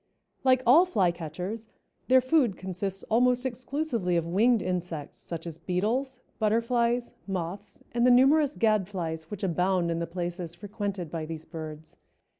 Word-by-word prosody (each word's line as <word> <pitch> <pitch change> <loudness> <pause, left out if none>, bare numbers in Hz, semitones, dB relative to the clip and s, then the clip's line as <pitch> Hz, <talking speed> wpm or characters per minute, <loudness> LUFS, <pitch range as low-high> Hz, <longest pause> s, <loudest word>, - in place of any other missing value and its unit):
Like 255 -1 +4
all 315 +10 +7
Flycatchers, 180 - -2 0.4
their 260 0 +6
food 255 - +2
consists 190 +1 -4
almost 250 +2 +2
exclusively 250 - -1
of 165 - 0
winged 215 +6 +3
insects, 175 -4 -4
such 165 -1 -7
as 165 -1 -7
beetles, 215 +11 -1 0.2
butterflies, 235 +2 +1
moths 190 +2 -5
and 235 0 +1
the 250 - +6
numerous 275 +4 +5
gadflies 180 -7 0
which 205 -2 -7
abound 180 -1 +1
in 165 - -1
the 170 - -2
places 175 -1 -4
frequented 200 -3 -4
by 160 -2 -4
these 160 -1 -7
birds. 155 -2 -8
195 Hz, 140 wpm, -28 LUFS, 170-245 Hz, 0.4 s, all